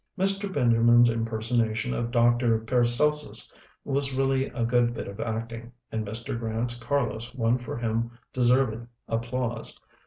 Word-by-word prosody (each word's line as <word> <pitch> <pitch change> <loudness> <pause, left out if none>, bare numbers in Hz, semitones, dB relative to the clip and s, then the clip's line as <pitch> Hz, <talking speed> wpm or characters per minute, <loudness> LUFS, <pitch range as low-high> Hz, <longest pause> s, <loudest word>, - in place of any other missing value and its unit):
"Mr. 195 +1 +1
Benjamin's 120 -3 +5
impersonation 115 0 -1
of 120 0 -2
'Dr. 120 -1 +3
Paracelsus' 125 +6 +1 0.3
was 140 -1 -1
really 135 0 +1
a 120 - -2
good 120 0 +2
bit - - -5
of 100 +2 -9
acting, 115 +1 -4 0.2
and 110 -1 -2
Mr. 115 +2 -4
Grant's 115 +1 -2
'Carlos' 120 -3 -2
won 120 0 +1
for 120 -1 -6
him 115 0 -1 0.2
deserved 125 -2 +2 0.2
applause. 115 0 -3
120 Hz, 130 wpm, -27 LUFS, 115-125 Hz, 0.3 s, Benjamin's